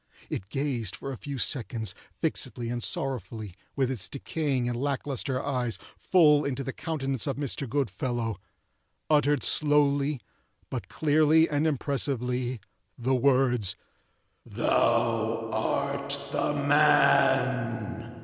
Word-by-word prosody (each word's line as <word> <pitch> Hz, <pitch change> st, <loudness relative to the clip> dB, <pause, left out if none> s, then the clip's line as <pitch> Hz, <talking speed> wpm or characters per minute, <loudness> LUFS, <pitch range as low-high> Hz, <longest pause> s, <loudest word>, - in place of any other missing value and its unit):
It 95 Hz, -, -4 dB
gazed 130 Hz, -8 st, -2 dB
for 135 Hz, -, -6 dB
a -, -, -4 dB
few 140 Hz, +1 st, -6 dB
seconds, 115 Hz, -6 st, -1 dB, 0.3 s
fixedly 120 Hz, -1 st, -2 dB
and 120 Hz, 0 st, -3 dB
sorrowfully, 115 Hz, -7 st, -3 dB, 0.2 s
with 135 Hz, -2 st, +1 dB
its 115 Hz, -8 st, -4 dB
decaying 140 Hz, -3 st, -2 dB
and 120 Hz, -, -1 dB
lack 140 Hz, -1 st, -1 dB
lustre 135 Hz, -1 st, -2 dB
eyes, 125 Hz, -4 st, -1 dB, 0.2 s
full 150 Hz, -5 st, +4 dB
into 140 Hz, -1 st, -2 dB
the 135 Hz, -, -4 dB
countenance 135 Hz, -6 st, -2 dB
of 135 Hz, -, -2 dB
Mr. 140 Hz, -2 st, -3 dB
Goodfellow; 120 Hz, -, -2 dB, 0.7 s
uttered 145 Hz, -2 st, +3 dB
slowly, 145 Hz, -1 st, +3 dB, 0.5 s
but -, -, -4 dB
clearly 155 Hz, +1 st, +3 dB
and 150 Hz, +2 st, +1 dB
impressively, 130 Hz, -4 st, -1 dB, 0.4 s
the 125 Hz, +2 st, 0 dB
words—"Thou 115 Hz, -2 st, 0 dB
art 140 Hz, +5 st, -1 dB
the 145 Hz, -, 0 dB
man!" 130 Hz, -6 st, +2 dB
135 Hz, 110 wpm, -27 LUFS, 120-145 Hz, 0.7 s, full